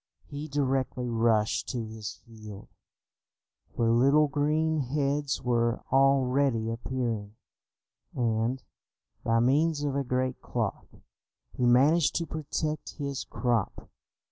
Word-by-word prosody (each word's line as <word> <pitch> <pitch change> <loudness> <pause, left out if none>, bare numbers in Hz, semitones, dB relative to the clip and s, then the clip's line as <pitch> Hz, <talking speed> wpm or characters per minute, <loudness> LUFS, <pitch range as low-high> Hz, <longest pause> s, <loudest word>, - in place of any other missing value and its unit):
He 145 +2 -7
directly 135 -3 -1
rushed 115 -2 +1
to 120 -4 -3
his 110 -2 -7
field, 110 -4 -11 1.1
where 115 -1 +2
little 140 +6 +4
green 155 +2 +1
heads 140 +1 -1
were 120 -1 +1
already 135 -3 +3
appearing, 115 -3 -3 0.8
and, 115 +1 0 0.6
by 115 0 +2
means 145 +5 +2
of 140 -2 -1
a 140 - 0
great 130 0 -2
cloth, - - -4 0.6
he 125 - 0
managed 140 +5 +4
to 170 - 0
protect 155 0 -4
his 140 -3 -4
crop. 120 -5 -2
130 Hz, 110 wpm, -28 LUFS, 115-145 Hz, 1.1 s, little